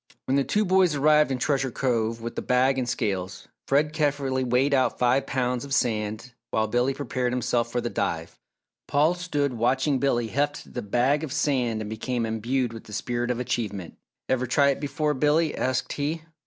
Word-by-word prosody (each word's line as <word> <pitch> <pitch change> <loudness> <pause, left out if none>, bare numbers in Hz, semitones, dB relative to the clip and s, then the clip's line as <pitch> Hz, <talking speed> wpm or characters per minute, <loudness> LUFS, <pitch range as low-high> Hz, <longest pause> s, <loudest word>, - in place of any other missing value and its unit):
When 130 - +1
the 140 - +3
two 210 - +1
boys 185 -4 +3
arrived 150 +1 +4
in 130 - -1
Treasure 135 +1 0
Cove 115 -3 -1
with 115 0 -5
the - - -2
bag 130 +1 +2
and 125 -1 -2
scales, 95 -6 -3 0.2
Fred 150 +2 +2
carefully 140 -4 0
weighed 130 +3 +2
out 130 -3 +2
five 125 +2 +2
pounds 125 -1 -1
of 140 -1 -2
sand 110 0 -1 0.2
while 110 - +1
Billy 120 +4 +1
prepared 130 -3 -2
himself 120 -1 0
for 120 - -1
the 120 - -2
dive. 80 0 -3 0.5
Paul 150 +4 +3
stood 145 -6 -1
watching 130 +4 +1
Billy 120 -4 +1
heft 145 +5 -2
the - - -3
bag 125 +8 +1
of 155 - -4
sand 125 -7 0
and 105 - -5
became 115 +2 -2
imbued 115 +2 -1
with 115 - -10
the 105 - -11
spirit 120 +2 -2
of 125 -1 -1
achievement. 105 -8 -3 0.3
"Ever 130 -1 0
try 140 +3 +4
it 140 - 0
before, 150 +1 -1
Billy?" 150 +3 +2
asked 130 0 -1
he. 155 +3 -2
130 Hz, 190 wpm, -25 LUFS, 120-145 Hz, 0.5 s, arrived